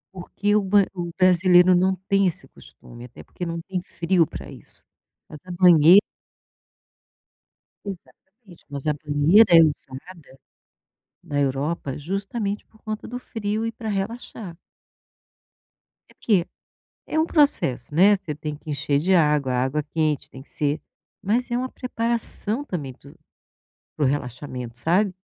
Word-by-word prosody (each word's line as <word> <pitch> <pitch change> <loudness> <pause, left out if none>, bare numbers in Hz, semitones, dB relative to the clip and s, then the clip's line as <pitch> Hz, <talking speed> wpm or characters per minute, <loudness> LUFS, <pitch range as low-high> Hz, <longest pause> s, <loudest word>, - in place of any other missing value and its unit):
Porque 185 +2 -7
o 210 - +4
ban 200 -2 +5
o 175 -2 -4
brasileiro 180 0 +5
não 185 +1 +2
tem 195 -1 +3
esse 160 -5 -4
costume, 120 0 -14
até 120 - -13
porque 175 - -7
não 170 0 -4
tem 185 -2 -3
frio 170 -2 0
pra - - -9
isso, - - -9 0.4
mas 150 - -11
a 185 - -16
banhe 175 -1 +6 1.9
Exatamente. 195 +1 -12
Mas 140 +1 -5
a 150 - +2
banheira 150 +8 +4
é - - +9
usada 145 0 -4 0.8
na 145 - -3
Europa 140 +1 -2
justamente 200 +5 -4
por 220 - -26
conta 215 -1 -6
do 245 +1 -6
frio 220 -2 -3
e 230 - -2
pra 225 -1 -7
relaxar. 200 -3 -5 1.5
É - - -20
que 190 -6 +2 0.6
é 315 - -2
um 320 - +2
processo, 150 - +1
né, 200 +4 +6
você 155 -5 -7
tem 150 +1 -6
que 155 - -10
encher 140 0 0
de 185 +5 +2
água, 150 -6 +2
a 125 0 +1
água 145 +3 -1
quente 155 -1 -2
tem 130 - -11
que - - -21
ser 150 +1 -2 0.4
mas 235 +6 0
é 240 - 0
uma 255 +1 -3
preparação 230 0 0
também 150 - -5
para 140 +3 -17
o, - - -17 0.8
para 150 - 0
o - - +3
relaxamento, 125 -3 -4
sabe? 185 - +1
175 Hz, 150 wpm, -23 LUFS, 145-205 Hz, 1.9 s, é